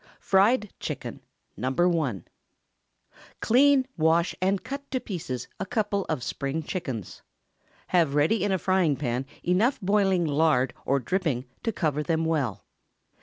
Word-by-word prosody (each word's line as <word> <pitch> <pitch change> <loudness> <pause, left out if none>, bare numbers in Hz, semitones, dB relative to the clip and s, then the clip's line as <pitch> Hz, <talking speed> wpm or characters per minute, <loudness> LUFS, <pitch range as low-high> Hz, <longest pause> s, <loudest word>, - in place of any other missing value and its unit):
FRIED 205 +2 +3
CHICKEN - - -5 0.3
(No. 125 +6 -2
1). 160 - +1 1.1
Clean, 265 +3 +4
wash, 165 +2 +3
and 190 +1 +1
cut 280 +1 -6
to 260 - -1
pieces 160 - -5
a 195 - -2
couple 205 -2 -1
of 150 -6 -1
Spring 140 +5 -3
chickens. 130 - -5 0.7
Have 165 -6 +2
ready 165 +8 +2
in 205 - +1
a 190 - +2
frying 185 -5 +2
pan 130 -1 -2 0.2
enough 210 +10 +2
boiling 195 -3 +2
lard 145 -4 +2
or 140 +1 +3
dripping 150 -4 -1 0.2
to 230 - -1
cover 155 -7 -1
them 165 +1 0
well. 145 -10 -1
170 Hz, 135 wpm, -26 LUFS, 140-200 Hz, 1.1 s, Clean